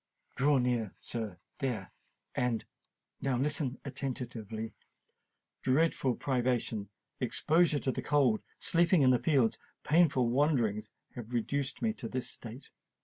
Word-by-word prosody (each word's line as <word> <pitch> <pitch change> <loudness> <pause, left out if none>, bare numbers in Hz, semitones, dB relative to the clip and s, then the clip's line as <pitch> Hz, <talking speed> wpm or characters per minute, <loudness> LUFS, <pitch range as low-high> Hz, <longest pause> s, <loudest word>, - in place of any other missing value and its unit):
"Draw 140 +2 +4
near, 120 -5 0
sir—there—and 115 - -4 0.6
now 135 -2 +1
listen 140 -1 0
attentively. 120 -5 -4 0.9
Dreadful 135 -2 +2
privation—exposure 125 - 0
to 135 - 0
the - - -3
cold—sleeping 150 - +2
in 130 - +6
the 125 - +4
fields—and 130 -3 0
painful 150 -6 +4
wanderings 120 -6 +1 0.2
have 120 -1 -8
reduced 140 +4 -1
me 220 -1 +2
to 115 - -6
this 130 -1 -2
state. 120 +4 -9
125 Hz, 100 wpm, -32 LUFS, 115-145 Hz, 0.9 s, in